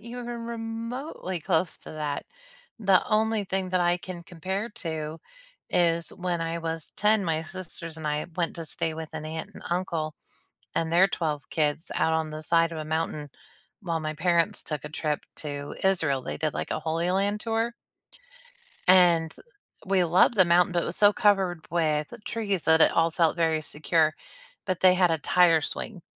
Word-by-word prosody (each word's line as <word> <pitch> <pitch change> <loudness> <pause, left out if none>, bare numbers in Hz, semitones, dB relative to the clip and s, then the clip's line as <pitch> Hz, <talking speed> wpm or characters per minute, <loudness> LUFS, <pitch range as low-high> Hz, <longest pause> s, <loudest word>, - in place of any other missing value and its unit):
even 240 +2 -7 0.2
remotely 230 - -5
close 165 0 0
to - - -11
that, 150 -2 -3 0.5
the 195 -2 +5
only 220 -1 +2
thing 190 0 -1
that 185 -1 +2
I 175 0 +3
can 175 -1 -8
compare 190 +6 -4
to 160 -5 -5 0.5
is 170 -2 +2
when 175 -2 -2
I 165 0 -2
was 165 -1 -5
10, 210 -1 +3
my 160 -2 0
sisters 165 -1 -8
and 160 -1 -4
I 150 0 -1
went 170 -2 -1
to 165 - -5
stay 160 +1 -3
with 160 0 -7
an - - -5
aunt 160 +1 -5
and - - -11
uncle, 170 -3 -2 0.6
and 165 0 0
their 185 +3 +6
12 155 -5 -2
kids 155 +1 -1
out 160 - +2
on 160 -1 0
the 155 0 -7
side 165 +1 +3
of 165 - -6
a 155 - -4
mountain 155 -2 -2 0.5
while 170 -4 -2
my 155 0 -3
parents 170 +1 +1
took 150 -2 -5
a 150 - -6
trip 150 -1 -1 0.2
to 145 -1 -5
Israel, 165 -8 +2
they - - -5
did, 155 0 -1
like, - - -4
a - - -2
Holy 165 +3 -1
Land 200 +3 +1
Tour. 225 +1 -1 1.1
And 175 -3 +5 0.5
we 190 -1 +3
loved 175 +7 +4
the 185 - +7
mountain, 175 +1 +4
but 175 -1 +1
it - - -3
was 170 - -5
so 205 0 +6
covered 195 -5 +2
with 155 -3 0
trees 200 -6 -1
that 160 0 +4
it - - +6
all 165 0 +3
felt 165 0 +2
very 160 -2 +2
secure. 155 +1 +1 0.5
But 185 -2 -1
they 185 -1 +7
had 180 -2 +4
a 165 - +1
tire 165 +1 +4
swing, 180 +3 -5
170 Hz, 185 wpm, -27 LUFS, 160-185 Hz, 1.1 s, the